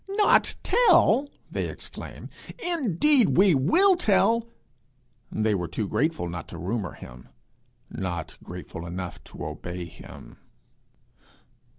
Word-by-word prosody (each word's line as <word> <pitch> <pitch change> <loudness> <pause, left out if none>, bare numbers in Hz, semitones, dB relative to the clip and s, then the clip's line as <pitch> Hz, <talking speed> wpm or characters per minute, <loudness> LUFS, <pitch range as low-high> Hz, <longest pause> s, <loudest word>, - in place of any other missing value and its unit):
'Not 410 +1 +3
tell!' 315 - +4 0.2
they - - -2
exclaim. - - -8 0.3
'Indeed, 295 - +2
we 190 -1 +6
will 335 - +4
tell!' 230 - +2 0.8
They 110 0 +1
were 90 -3 -1
too 100 +5 -3
grateful 155 - 0
not 85 -1 -6
to - - -9
rumour 95 -1 -3
him, 60 0 -12 0.6
not 85 -4 -5
grateful 85 +1 -8
enough 90 +1 -6
to - - -8
obey 90 0 -6
him. 85 - -13
155 Hz, 110 wpm, -26 LUFS, -, 0.8 s, we